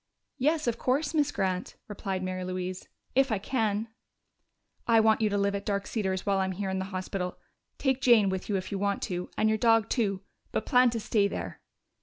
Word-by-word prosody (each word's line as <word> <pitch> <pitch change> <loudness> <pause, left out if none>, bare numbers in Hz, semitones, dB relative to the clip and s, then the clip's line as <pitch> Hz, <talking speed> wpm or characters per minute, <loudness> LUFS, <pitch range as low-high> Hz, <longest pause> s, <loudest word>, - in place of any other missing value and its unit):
"Yes, 305 +4 +2
of 235 -1 -1
course, 285 +4 0
Miss 295 -2 +2
Grant," 185 -6 -2
replied 195 -2 -4
Mary 185 0 -3
Louise. 185 0 -4 0.3
"If 270 0 +3
I 215 - +2
can." 215 0 -1 1.0
"I 230 -1 +6
want 220 0 +4
you 215 - +3
to 205 - 0
live 200 0 +1
at 200 0 -3
Dark 200 -1 -1
Cedars 190 -4 -2
while 200 -1 +2
I'm 190 0 0
here 195 +1 -3
in 190 - -1
the 190 - -2
hospital. 185 -1 -4 0.4
Take 265 -1 0
Jane 235 -6 +6
with 190 +1 -4
you, 200 - +1
if 185 - -5
you 200 - -2
want 200 0 0
to, 180 -1 -3
and 220 - +3
your 220 0 +2
dog 225 -1 +4
too 200 -6 0 0.3
but - - -2
plan 250 -2 +5
to 230 -1 -2
stay 210 -1 +2
there." - - -6
205 Hz, 210 wpm, -28 LUFS, 190-230 Hz, 1.0 s, I